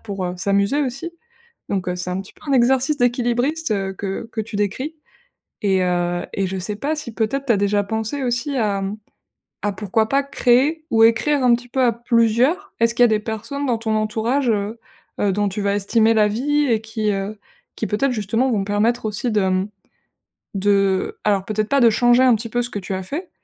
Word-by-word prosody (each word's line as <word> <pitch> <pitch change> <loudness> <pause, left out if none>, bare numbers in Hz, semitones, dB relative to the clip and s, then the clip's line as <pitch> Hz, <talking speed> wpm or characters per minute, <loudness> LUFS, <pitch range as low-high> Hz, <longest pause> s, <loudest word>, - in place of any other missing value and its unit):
pour, 200 -4 -5
heu, 180 - -4
s'amuser 200 +8 +1
aussi. 275 +6 -4 0.6
Donc, 190 -2 -2
heu, 180 - -2
c'est 180 0 -4
un 185 - -2
petit 195 - -11
peu - - -23
un - - +2
exercice 265 +4 +3
d'équilibriste, 245 +4 0
heu, 195 -1 -2
que 195 +4 -5
que 220 - -2
tu 215 0 -7
décris. 210 - -2 0.7
Et 190 -2 +2
heu 175 -1 0
et 195 -1 0
je 190 - -4
sais 205 +3 -4
pas 290 +8 -1
si, 255 -7 -6
peut-être, 265 +6 -1
tu 240 - +4
as - - +2
déjà 205 +1 +1
pensé 220 +6 -3
aussi 245 +3 -1
à, 210 -5 0
mmh, 195 +2 -3 0.7
à 205 -1 0
pourquoi 215 +3 0
pas 275 +1 +2
créer 275 +3 +2
ou 225 0 +4
écrire 270 +5 +3
un 245 -1 +6
petit 245 +1 -11
peu 260 +1 0
à 245 - +5
plusieurs? 240 - +1
Est-ce 230 0 +3
qu'il 245 - +3
y - - +7
a - - +1
des 215 - +2
personnes 225 +6 -4
dans 240 -3 +1
ton 220 -1 -1
entourage, 225 +5 0
heu, 210 +1 -2 0.4
heu, 200 -1 +2
dont 205 +1 0
tu 195 +2 -4
vas 200 0 +1
estimer 220 +3 +2
l'avis 250 +8 +2
et 230 -4 +2
qui, 220 -1 -2
heu, 195 +2 -3 0.4
qui 220 - -2
peut-être, 250 +5 +1
justement, 225 +4 0
vont 210 -5 +1
permettre 220 +4 0
aussi 215 +4 -2
de, 210 - +2
mmh, 185 +1 0 0.9
de 195 -1 +1
alors 200 -2 +2
peut-être 215 0 -2
pas 280 - +3
de 235 - +7
changer 240 +3 +4
un 255 -2 +6
petit 230 +1 -5
peu 240 +2 0
ce 240 - -5
que 205 - -3
tu 190 0 -5
as 190 - -4
fait, 315 - -5
220 Hz, 220 wpm, -21 LUFS, 200-245 Hz, 0.9 s, y